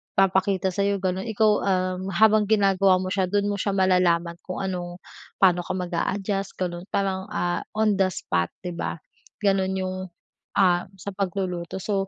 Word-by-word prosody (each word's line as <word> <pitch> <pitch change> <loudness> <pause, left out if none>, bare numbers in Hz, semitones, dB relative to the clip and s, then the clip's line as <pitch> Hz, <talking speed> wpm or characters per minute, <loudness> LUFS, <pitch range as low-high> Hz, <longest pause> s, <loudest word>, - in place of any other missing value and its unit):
papakita 190 0 +2
sayo, 200 +1 +1
ganun. 190 +2 -2
Ikaw, 220 -1 +3
uhm, 185 -1 0
habang 215 +1 +5
ginagawa 195 -3 +4
mo 185 0 -3
siya, 190 -1 +1
dun 205 +2 +1
mo 200 - -3
siya 200 +1 -1
malalaman 175 -3 +2
kung 185 +1 -4
ano, 175 -2 -4 0.4
paano 180 -2 +5
ka - - -3
mag 180 -1 -4
a-adjust, 195 +3 -2
ganun. 175 0 -4
Parang, 190 -1 -1
ah, 175 0 -1 0.2
on 215 -2 +2
the 190 - +4
spot, 85 - -1 0.2
di 180 - -4
ba, 170 - -3 0.5
ganun 190 -1 +2
yung, 185 0 -2 0.6
ah, 180 -3 +3
sa 195 +2 -7
pagluluto. 185 -2 -3
So, 195 -2 -1
190 Hz, 165 wpm, -25 LUFS, 180-200 Hz, 0.6 s, habang